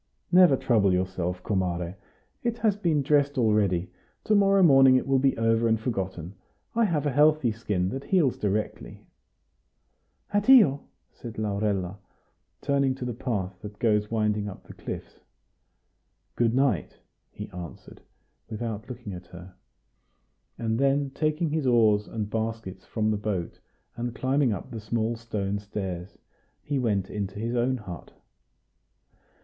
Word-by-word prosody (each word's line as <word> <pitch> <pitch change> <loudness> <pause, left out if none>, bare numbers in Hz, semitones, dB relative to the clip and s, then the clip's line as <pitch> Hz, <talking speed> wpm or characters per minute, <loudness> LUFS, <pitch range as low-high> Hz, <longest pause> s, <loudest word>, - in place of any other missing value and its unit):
"Never 180 -6 +6
trouble 105 -7 +2
yourself, 90 -1 -2
comare. 90 -3 -1 0.5
It 235 -1 -1
has 215 -4 +2
been 165 -8 +1
dressed 145 0 +2
already; 100 -6 +2 0.3
to 215 - +1
morrow 195 -1 +5
morning 135 -5 +7
it 130 - +2
will 135 -1 +3
be 135 0 +2
all 115 - -1
over 115 +1 +3
and 110 -1 +2
forgotten. 95 -7 -4 0.4
I 230 0 +3
have 155 -7 0
a 145 - +1
healthy 150 -2 +4
skin, 105 -5 -1
that 135 +6 -5
heals 165 -10 +2
directly." 105 +1 -3 1.3
"Addio!" 205 - +6 0.3
said 115 -2 -10
Laurella, 100 -3 -1 0.6
turning 140 -2 +1
to 130 - -6
the 120 - -3
path 100 -6 -3
that 105 -1 -9
goes 105 -2 +1
winding 105 -2 0
up 95 - -11
the - - -12
cliffs. - - -8 1.2
"Good 120 0 +2
night!" 135 -1 +1 0.3
he - - -8
answered, 90 -2 -10 0.5
without 110 0 -5
looking 120 -5 -7
at 90 0 -9
her; 90 +1 -12 1.0
and 110 0 -1
then 140 0 +2
taking 155 +2 -1
his 155 -3 0
oars 110 -4 +4
and 110 -2 -4
baskets 110 -4 -4
from 110 -1 0
the 105 - 0
boat, 100 -5 -3 0.4
and 120 0 -4
climbing 130 -1 +1
up 100 +1 -5
the 115 - -5
small 110 +1 -1
stone 105 -3 -3
stairs, 95 -3 -6 0.5
he 145 -2 -1
went 100 -6 0
into 100 -1 -4
his 115 +3 -2
own 125 +2 +1
hut. 95 -7 -9
115 Hz, 145 wpm, -26 LUFS, 100-135 Hz, 1.3 s, morning